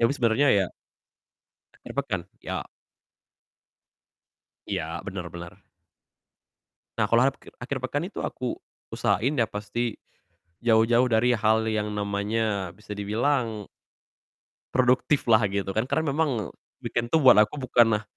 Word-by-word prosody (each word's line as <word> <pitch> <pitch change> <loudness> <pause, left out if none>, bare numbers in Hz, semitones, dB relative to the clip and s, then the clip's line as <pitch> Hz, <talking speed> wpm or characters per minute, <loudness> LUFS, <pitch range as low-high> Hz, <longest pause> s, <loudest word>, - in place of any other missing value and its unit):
Tapi 115 +2 +4
sebenernya 120 +3 +3
ya, 95 - +2 1.1
akhir - - -11
pekan, 120 -10 -1 0.2
iya. - - -3 2.0
Iya, 95 -5 -2 0.2
bener 95 -2 -5
bener. 90 +3 -10 1.3
Nah, 110 - +2
kalo 120 +5 +4
apkir 135 - -10
akhir 130 +2 -4
pekan 145 +7 -2
itu 205 - -6
aku 125 -1 -3 0.3
usahain 115 +9 0
ya 115 - +3
pasti, 110 +2 -4 0.6
jauh-jauh 115 +1 +4
dari 120 +2 +3
hal 110 0 +2
yang 105 -1 -1
namanya 100 -1 -1
bisa 105 +2 -9
dibilang 110 +1 -1 1.1
produktiflah 125 -2 +3
gitu 100 -1 -2
kan, 110 +4 0
karena 160 +1 0
memang 135 - 0 0.3
weekend 120 0 -1
tuh 160 - +4
buat 130 -5 +8
aku 105 - +2
bukanlah, 115 -4 +3
110 Hz, 120 wpm, -26 LUFS, 105-125 Hz, 2.0 s, buat